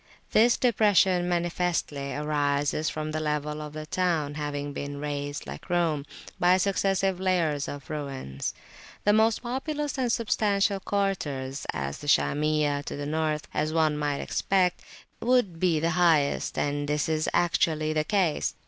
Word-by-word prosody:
This 235 +2 +5
depression 195 -6 +3
manifestly 170 -5 -1
arises 145 0 0
from 155 0 -4
the 155 - -2
level 150 0 -2
of 150 -1 -7
the 155 0 -6
town 160 -4 0
having 145 -1 -4
been 140 0 -5
raised, 145 0 -4
like - - -9
Rome, 165 -5 +1 0.3
by 180 0 +5
successive 195 -1 +1
layers 170 -6 +1
of 145 -1 -7
ruins; 135 - -4 0.5
the 205 - +4
most 220 +2 +3
populous 285 +3 -3
and 245 -2 +1
substantial 205 -3 +1
quarters 150 -10 -2
(as 70 -3 -4
the 145 - -9
Shamiyah 150 0 +2
to - - -5
the 145 - -4
north) 155 0 -1
would, 155 - 0 0.2
we - - -3
might 145 -1 -1
expect, 185 -2 +1 0.4
be 185 -9 +2
the 165 +2 +1
highest, 165 -5 +2
and 145 0 -1
this 150 +2 0
is 155 -1 0
actually 160 -3 +1
the 155 0 +1
case. 185 -3 0
155 Hz, 145 wpm, -27 LUFS, 145-185 Hz, 0.5 s, This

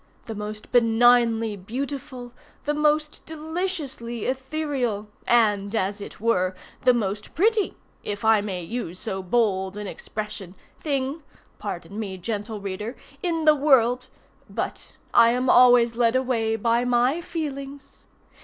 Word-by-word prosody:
the 225 - -5
most 210 0 -7
benignly 230 -2 +4
beautiful, 250 +4 -6 0.3
the 295 - +1
most 300 0 +1
deliciously 315 - -4
ethereal, 260 -5 -2 0.2
and, 210 -3 +3
as 205 0 -1
it - - -9
were, 185 -4 +1 0.3
the 255 - +6
most 210 -3 -2
pretty 425 +4 +2 0.3
(if 205 +1 -4
I 220 -1 +5
may 190 -4 -4
use 185 -2 -5
so 190 +1 -4
bold 190 -1 0
an 210 - -5
expression) 200 -2 -6 0.2
thing 280 +1 -2 0.4
(pardon 200 0 -6
me, 195 -4 -4
gentle 210 +3 -4
reader!) 200 +5 -5 0.3
in 330 -4 -1
the 305 - +8
world—but 255 -4 0 0.2
I 235 0 +6
am 250 +1 +2
always 245 -1 +6
led 235 0 +3
away 235 -4 +1
by 230 +2 +1
my 245 +6 +2
feelings. 280 -4 -6
235 Hz, 125 wpm, -25 LUFS, 210-270 Hz, 0.4 s, the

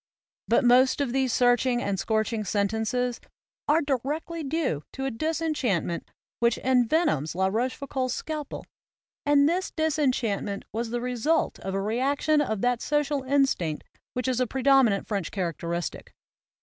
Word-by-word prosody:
But 235 - +3
most 250 +3 +5
of 270 -4 -1
these 265 -2 +1
searching 245 0 +3
and 200 -5 -2
scorching 220 +2 0
sen 200 0 +1
tences 235 +3 -1 0.5
are 305 +2 +3
directly 295 +5 -2
due 275 - -1
to 270 - -4
a 270 - -1
disenchantment 270 - -1 0.3
which 235 -1 +2
envenoms 250 - +2
La 190 +1 +1
Rochefoucauld's 255 +5 -1
scalpel; 305 -2 -5 0.6
and 290 0 +5
this 360 +4 0
disenchantment 255 -11 -1
was 230 +1 -2
the 240 +1 -2
result 250 +6 0
of 190 0 -4
a - - 0
reaction 280 +7 +1
of 220 -8 -2
that 245 -1 +1
social 295 -1 0
instinct 260 - +1 0.3
which 250 +1 -2
is 255 -1 0
a 255 - +1
pre 265 +2 -4
dominant 265 -8 +4
French 200 -6 -2
characteristic. 170 -2 -4
250 Hz, 145 wpm, -26 LUFS, 220-285 Hz, 0.6 s, most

